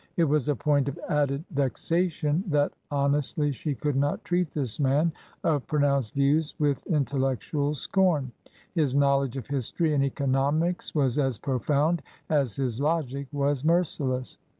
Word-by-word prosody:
It 170 - +4
was 150 -2 +1
a 145 - +2
point 140 +3 +1
of 140 - -7
added 145 0 +1
vexa 155 +6 +1
tion 155 +2 -1
that 145 -3 +1 0.2
honestly 145 +1 +1
she 140 +2 -3
could 145 +4 -1
not 145 +2 0
treat 175 -2 +1
this 135 -6 -3
man 145 +4 +2 0.3
of 150 -5 +1
pro 150 - 0
nounced 140 -5 +1
views 145 +3 +2
with 145 -3 0
intellectual 140 0 0
scorn. 155 -4 +1 0.4
His 150 -7 +1
knowledge 140 -2 +2
of 130 - -5
history 145 +4 0
and 140 -2 +2
economics 140 +6 0
was 135 -2 +2
as 135 -5 +1
profound 145 +6 0 0.3
as 140 -8 +1
his 125 -3 -2
logic 140 -3 -1
was 140 -1 0
merciless. 145 -6 0
145 Hz, 150 wpm, -27 LUFS, 135-150 Hz, 0.4 s, It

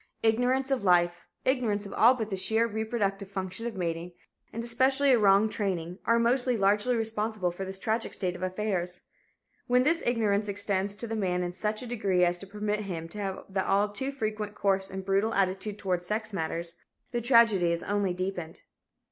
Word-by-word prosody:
Ignorance 250 +4 +2
of 265 -6 +1
life, 175 -2 +2 0.2
ignorance 230 -6 +1
of 200 - -8
all 245 +3 +6
but 220 -3 -4
the - - 0
sheer 220 +4 +2
reproductive 215 -3 -2
function 195 +3 -4
of 230 - -5
mating, 170 0 -3 0.4
and 230 - -4
especially 265 +4 +3
a 245 - +5
wrong 200 +1 +5
training, 185 -4 -3
are 230 - +4
most 245 +2 +2
largely 210 +1 +2
responsible 220 -4 -1
for 190 +3 -6
this 190 0 -5
tragic 225 +2 -1
state 180 -3 -2
of 180 - -9
affairs. 185 -2 -2 0.7
When 250 +1 +4
this 330 +4 +2
ignorance 215 -3 +1
extends 200 0 0
to 235 +3 -5
the 225 - -3
man 180 -4 0
in 175 0 -3
such 210 +5 -2
a - - -6
degree 200 -7 +1
as 175 0 0
to 195 - -10
permit 210 +1 -2
him 170 -5 -5
to 210 - -8
have 195 -2 -4
the 190 -1 -1
all 200 +2 +2
too 265 +7 -3
frequent 215 -5 -3
coarse 195 -1 +1
and 190 0 -6
brutal 200 +3 +1
attitude 195 +2 0
toward 185 -3 -1
sex 215 +4 -3
matters, 170 -1 -3 0.3
the 240 -1 -1
tragedy 230 -7 +5
is 170 0 -2
only 205 -2 0
deepened. 180 -2 -4
205 Hz, 190 wpm, -28 LUFS, 185-225 Hz, 0.7 s, all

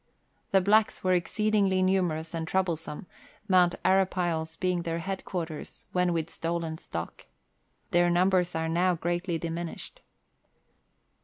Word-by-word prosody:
The 195 - +4
blacks 215 +3 +3
were 185 0 +3
exceedingly 195 +1 +2
numerous 175 -4 0
and 165 -1 -3
trouble 185 -2 +1
some, 155 +1 -8 0.4
Mount 180 -3 +4
Arapiles 175 -4 +1
being 180 0 0
their 165 -1 -2
head 190 +3 -4
quarters 165 -5 -6
when 180 -1 +2
with 165 -1 -2
stolen 165 -1 -3
stock. 85 0 -7 0.6
Their 175 0 +4
numbers 180 0 +2
are 160 0 -1
now 175 +2 +2
greatly 175 +1 -1
diminished. 170 +1 -6
175 Hz, 130 wpm, -28 LUFS, 165-185 Hz, 0.6 s, The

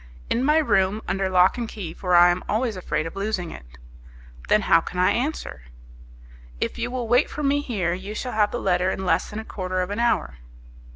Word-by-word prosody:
"In 240 - +1
my 300 +3 +4
room 210 -7 +2
under 195 0 -1
lock 185 +5 +4
and 230 -2 -3
key, 180 -7 -6
for 180 -2 0
I 175 0 +7
am 175 +1 -2
always 225 +1 0
afraid 155 -4 -2
of 165 - -7
losing 195 -4 -2
it." 60 - -11 0.8
"Then 210 - +4
how 165 - +4
can 180 - -8
I 185 +2 +4
answer?" 255 - -3 1.0
"If - - -3
you 240 +1 -2
will 245 -2 -3
wait 245 +5 +3
for 300 - -5
me 285 +1 +2
here, 195 -11 -1
you 195 +4 -6
shall 250 - -4
have 210 -1 +2
the - - -4
letter 180 -3 +1
in 190 0 -3
less - - +1
than 210 - -7
a 220 - -5
quarter 185 -3 -3
of 180 +2 -2
an 205 - -3
hour." 235 - 0
200 Hz, 220 wpm, -24 LUFS, 180-235 Hz, 1.0 s, I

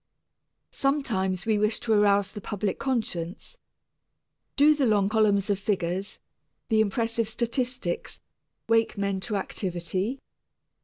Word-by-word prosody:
Sometimes 220 -10 0
we 215 -2 +2
wish 210 +1 +1
to 225 - +1
arouse 200 -2 +3
the 205 - -8
public 205 -2 -3
conscience. 225 - -3 1.0
Do 295 +2 +6
the 285 -4 +1
long 205 -2 +3
columns 210 -3 +3
of 200 - 0
figures, 190 -1 -2 0.5
the 220 -1 +4
impressive 225 +1 0
statistics, 240 -4 -2 0.5
wake 225 -1 +2
men 200 -1 -1
to 210 +3 -3
activity? 190 +4 -2
210 Hz, 115 wpm, -27 LUFS, 195-230 Hz, 1.0 s, Do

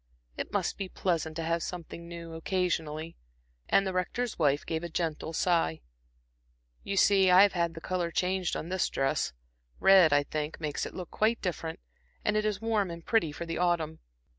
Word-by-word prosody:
It - - -5
must - - -1
be 195 -2 -3
pleasant 165 -5 -1
to 165 - -3
have 165 +1 0
something 170 -1 -6
new 170 -1 -8
occasionally" 165 -2 -2 0.5
and 195 - +4
the 190 - -2
Rector's 215 +6 -2
wife 145 -2 +2
gave 160 0 -2
a 170 - -4
gentle 160 -1 -2
sigh. 165 - +1 1.0
"You 200 - -3
see 195 -1 +5
I 180 +2 +8
have 205 - +3
had 170 -2 0
the 165 - -8
color 180 -1 -1
changed 180 +1 0
on 165 - -4
this 185 0 0
dress 135 - 0 0.5
red, 190 -5 +7
I 145 0 +4
think, 150 +1 -4
makes 150 -3 -2
it - - -11
look 180 -3 -7
quite 225 +2 +1
different, 165 -3 -4 0.5
and 210 - +2
it 215 0 +1
is 210 -3 0
warm 220 -4 0
and 170 -1 -8
pretty 220 -10 +2
for 170 - -6
the 165 0 -3
autumn. 170 -3 0
170 Hz, 190 wpm, -29 LUFS, 160-190 Hz, 1.0 s, I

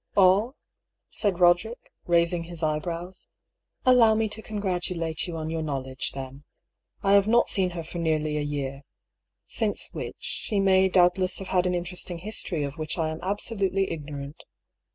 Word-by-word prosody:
" - - -39
All? 200 +7 +5 0.3
" - - -58
said 200 -5 0
Roderick, 180 +7 +2 0.2
raising 170 0 +2
his 170 -1 -4
eyebrows. 165 +4 -3 0.6
"Allow 240 -4 +6
me 220 0 +1
to 210 +2 -2
congratulate 180 -6 -2
you 170 -2 -5
on 160 0 -4
your 165 0 -2
knowledge, 135 -3 -3
then. 135 +1 -8 0.6
I 195 - +4
have 200 0 +5
not 235 +2 +4
seen 190 -2 +2
her 165 - -3
for 170 +2 -7
nearly 155 -2 0
a 150 - 0
year 140 -2 -3 0.4
— - - -59 0.3
since - - -1
which - - -5
she 205 - -3
may 190 -1 +4
doubtless 180 0 +3
have 195 - -6
had 180 -1 +2
an 180 - 0
interesting 175 0 -3
history 175 -4 -3
of 140 +2 -5
which 155 +2 -1
I 160 -2 0
am 160 - -6
absolutely 195 -1 -1
ignorant. 145 -2 -7
175 Hz, 175 wpm, -26 LUFS, 155-195 Hz, 0.6 s, Allow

